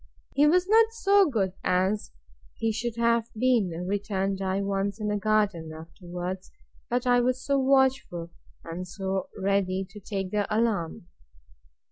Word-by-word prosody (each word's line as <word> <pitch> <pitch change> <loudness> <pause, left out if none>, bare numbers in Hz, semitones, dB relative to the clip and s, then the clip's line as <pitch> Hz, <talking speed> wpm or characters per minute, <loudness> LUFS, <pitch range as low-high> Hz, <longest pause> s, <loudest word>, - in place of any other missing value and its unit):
He 290 +2 +5
was 360 +4 +3
not 445 +2 +5
so 400 -5 +4
good 195 -8 0
as 185 +3 +1 0.5
he 225 - 0
should 230 +1 -3
have 235 0 +2
been, 240 -5 +3 0.2
returned 195 -1 -1
I, 190 +1 0
once 200 +1 -1
in 210 -1 -2
the 210 - 0
garden, 205 -6 +1
afterwards; 175 +3 -7 0.4
but 245 +1 0
I 245 -1 +4
was 255 +1 0
so 280 -1 +2
watchful, 265 -11 +2 0.3
and 170 +2 -6
so 190 +1 -3
ready 195 -1 0
to 205 +2 -12
take 195 -2 -4
the 205 -1 0
alarm! 215 -7 0
205 Hz, 145 wpm, -27 LUFS, 190-245 Hz, 0.5 s, He